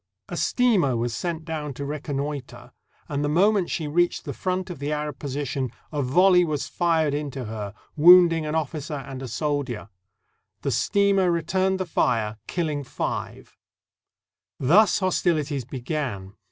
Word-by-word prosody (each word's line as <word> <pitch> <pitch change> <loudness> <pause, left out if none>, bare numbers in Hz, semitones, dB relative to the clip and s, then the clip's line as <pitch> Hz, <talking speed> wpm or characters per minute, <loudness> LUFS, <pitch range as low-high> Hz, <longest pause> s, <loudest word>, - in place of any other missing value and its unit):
A - - -4
steamer 190 - +2
was 115 0 -1
sent 165 -2 -3
down 150 -4 -4
to 140 - -5
reconnoiter, 145 -2 -5 0.4
and 145 0 -2
the 145 - 0
moment 190 +3 +3
she 155 - -2
reached 175 +4 +1
the - - -4
front 185 0 -2
of 165 - -8
the 145 +1 -3
Arab 150 -2 -3
position 140 -2 -3 0.2
a 150 -2 -1
volley 180 +7 +5
was 155 -4 -2
fired 165 -4 +1
into 140 -3 -4
her, 105 -2 -6 0.2
wounding 170 0 +7
an 150 - -2
officer 150 -1 -3
and 135 -1 -7
a 135 - -5
soldier. 135 -3 -2 0.7
The - - 0
steamer 200 -2 +2
returned 185 +3 0
the 185 - -1
fire, 110 -9 0
killing 155 -5 -2
five. - - -5 1.0
Thus 180 +10 +5
hostilities 160 - 0
began. 125 -7 -4
150 Hz, 145 wpm, -24 LUFS, 135-175 Hz, 1.0 s, wounding